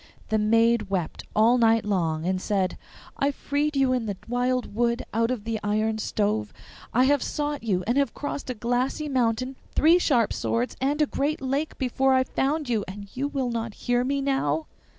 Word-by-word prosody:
The 220 0 +2
maid 225 0 +3
wept 185 -5 -3
all 230 +3 +5
night 225 -2 +4
long, 165 -6 0
and 185 0 0
said, 190 -3 0 0.4
'I 280 - +2
freed 290 +2 -1
you 270 -2 +3
in 245 -3 -1
the 200 -2 -3
wild 245 0 0
wood 235 +2 0
out 230 +1 +2
of 250 -5 -2
the 225 0 -2
iron 215 +1 0
stove; 210 0 -1 0.4
I 250 - +4
have 280 0 +3
sought 295 -1 -2
you, 190 -5 0
and 240 +5 +2
have 280 - 0
crossed 285 -2 -5
a 255 - -2
glassy 245 +6 -1
mountain, 255 -1 0 0.2
three 330 +4 +5
sharp 245 - +2
swords, 235 +2 -1
and 290 +3 +2
a - - +3
great 295 +2 -1
lake 275 +4 -2
before 265 +1 +2
I 260 - +4
found 285 +3 -1
you, 225 -4 0
and 200 +1 -9
will 275 0 -1
you - - -3
not 230 -2 -3
hear 245 0 0
me 275 +2 0
now? 160 - 0
240 Hz, 190 wpm, -25 LUFS, 215-270 Hz, 0.4 s, all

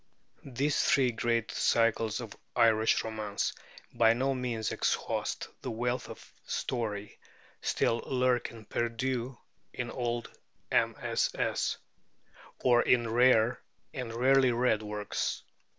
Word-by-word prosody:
These 140 +4 +1
three 130 -3 +3
great 115 0 0
cycles 115 -1 +1
of - - -8 0.2
Irish 110 -1 +4
romance 110 -2 -2 0.4
by 115 -1 +5
no 135 +3 0
means 120 -4 -2
exhaust - - -1
the - - -4
wealth 120 +2 -2
of - - -12
story, 105 -4 -3 0.4
still 115 - +1
lurking 125 -3 0
perdu 120 +2 -2 0.3
in 120 -1 -4
old 120 -2 -2 0.4
MSS. - - 0 0.9
or 120 -1 +5
in 120 -2 +2
rare 120 -1 +4 0.3
and 125 -3 -5
rarely 130 +2 +4
read 120 -2 +2
works. 105 -1 -3
120 Hz, 105 wpm, -30 LUFS, 110-125 Hz, 0.9 s, by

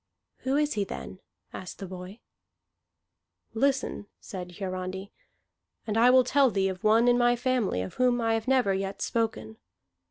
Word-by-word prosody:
"Who 265 +1 -1
is 295 0 +1
he, 205 - 0
then?" 190 -1 -7 0.3
asked 185 - -8
the 195 - -6
boy. 185 +3 -9 1.3
"Listen," 265 -3 0
said 180 -2 -8
Hiarandi, 190 0 -5 0.7
"and 215 -2 -2
I 235 +2 +6
will 255 0 +6
tell 265 +1 +3
thee 195 -3 +1
of 185 -1 -7
one 225 +3 +4
in 245 0 +4
my 240 0 +4
family 245 - 0
of 95 - -7
whom 250 -1 +3
I 225 -1 +1
have 225 +2 -2
never 255 -7 +3
yet 195 +1 -3
spoken. 110 - -2
220 Hz, 160 wpm, -28 LUFS, 190-245 Hz, 1.3 s, I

